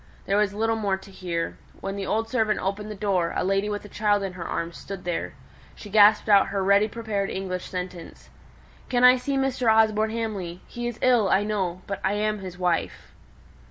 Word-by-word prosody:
There 195 - +1
was 210 -2 +2
little 225 +1 +1
more 200 -3 0
to 195 +1 -14
hear. 170 -3 -4 0.2
When 195 0 -4
the 200 -1 -4
old 225 +1 0
servant 220 -2 +1
opened 200 +2 -3
the 210 - -6
door, 190 -4 0
a - - 0
lady 195 +2 +1
with 205 0 -4
a - - -8
child 205 -1 +1
in 190 -2 -4
her 180 -2 -6
arms 170 0 -3
stood 195 -2 -8
there. 175 -1 -3 0.4
She 205 - -11
gasped 210 +1 +6
out 200 -2 +6
her 195 0 -2
ready 200 +2 +4
prepared 215 -3 -3
English 185 -1 -4
sentence, 180 -2 -7 0.6
"Can 245 -1 +1
I 250 +1 +8
see 275 +2 -2
Mr. 260 -3 +2
Osborne 220 0 +3
Hamley? 205 -6 -4
He 240 0 -5
is 240 -2 -5
ill, 240 -6 +4
I 195 - +3
know; 185 -4 -2
but 200 - -4
I 190 - +1
am 210 0 -1
his 185 -2 -8
wife." 180 -2 -2
205 Hz, 205 wpm, -25 LUFS, 190-220 Hz, 0.6 s, I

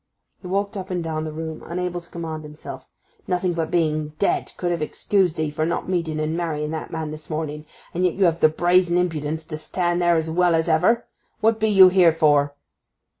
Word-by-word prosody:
He 180 - -8
walked 200 +3 -1
up 190 -1 -5
and 180 -2 -2
down 160 -1 -3
the 155 - -4
room, 160 0 -6
unable 175 0 -3
to 170 - -19
command 160 -2 -5
himself. 150 0 -10 0.4
'Nothing 180 -1 0
but 165 -1 -2
being 155 -3 0
dead 200 - 0
could 175 -1 -1
have 170 -2 -2
excused 180 +2 0
'ee 155 -1 0
for 155 +1 -2
not 170 +2 -1
meeting 165 -4 -1
and 155 +1 -1
marrying 155 -3 -2
that 160 - -5
man 160 -2 -4
this 155 0 -10
morning; 155 -1 -4 0.3
and 180 - -1
yet 180 -2 +2
you 195 - +3
have 165 -1 +2
the 155 - +6
brazen 175 +2 +3
impudence 160 -3 -1
to 155 - -5
stand 175 +2 -1
there 175 -1 +4
as 160 0 0
well 175 +1 +2
as 160 +1 +1
ever! 175 +9 +3 0.3
What 225 0 +2
be 220 - +2
you 190 -3 +8
here 180 -2 +5
for? 145 -3 +2
165 Hz, 215 wpm, -23 LUFS, 155-180 Hz, 0.4 s, you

